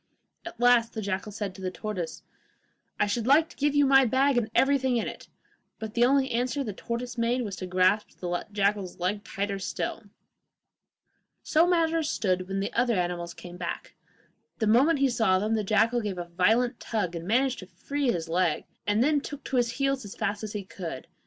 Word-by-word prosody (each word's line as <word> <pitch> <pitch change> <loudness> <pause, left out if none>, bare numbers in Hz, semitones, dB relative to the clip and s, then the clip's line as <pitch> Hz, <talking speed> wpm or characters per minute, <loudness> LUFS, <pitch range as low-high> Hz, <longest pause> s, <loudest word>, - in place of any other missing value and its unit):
At 290 - -9
last 240 -1 +4
the 220 - -4
jackal 200 +2 -3
said 205 -2 -4
to 190 - -12
the 185 - -2
tortoise, 185 -3 -5 0.8
'I - - +4
should 220 +3 -2
like 310 +4 +5
to - - -15
give 290 0 0
you 290 0 +5
my 270 0 +6
bag 265 +3 +2
and 235 -3 +1
everything 265 -2 +3
in 225 - -1
it,' - - -8 0.5
but 220 -1 -6
the 235 - +3
only 270 0 +2
answer 250 +3 0
the 215 -5 -4
tortoise 235 +3 -5
made 240 +2 +1
was 200 -4 -4
to 185 - -5
grasp 185 +3 +1
the 175 -1 -3
jackal's 200 -2 0
leg 200 +4 -2
tighter 200 0 -3
still. 190 - -4 1.4
So 325 +2 +3
matters 330 -3 +2
stood 185 -2 0
when 195 0 -2
the 200 - -3
other 240 -1 +2
animals 175 -1 -2
came 175 0 -10
back. 175 -1 -5 0.6
The 220 - 0
moment 265 +9 +4
he 275 0 +3
saw 205 -6 +3
them, 210 +4 0
the 220 -1 +1
jackal 225 +4 +2
gave 205 -4 -4
a 175 - -4
violent 220 +9 +1
tug, 210 -6 -2
and 170 0 -6
managed 255 +4 +2
to 185 - -10
free 270 +9 -2
his 165 -4 -3
leg, 170 -1 +1 0.2
and 205 +3 +3
then 295 +1 +2
took 290 0 -8
to 265 - -2
his 235 -1 +1
heels 275 0 0
as 205 - -9
fast 210 0 -2
as 215 - -5
he 205 -2 -4
could. 175 -7 -7
220 Hz, 205 wpm, -27 LUFS, 190-255 Hz, 1.4 s, my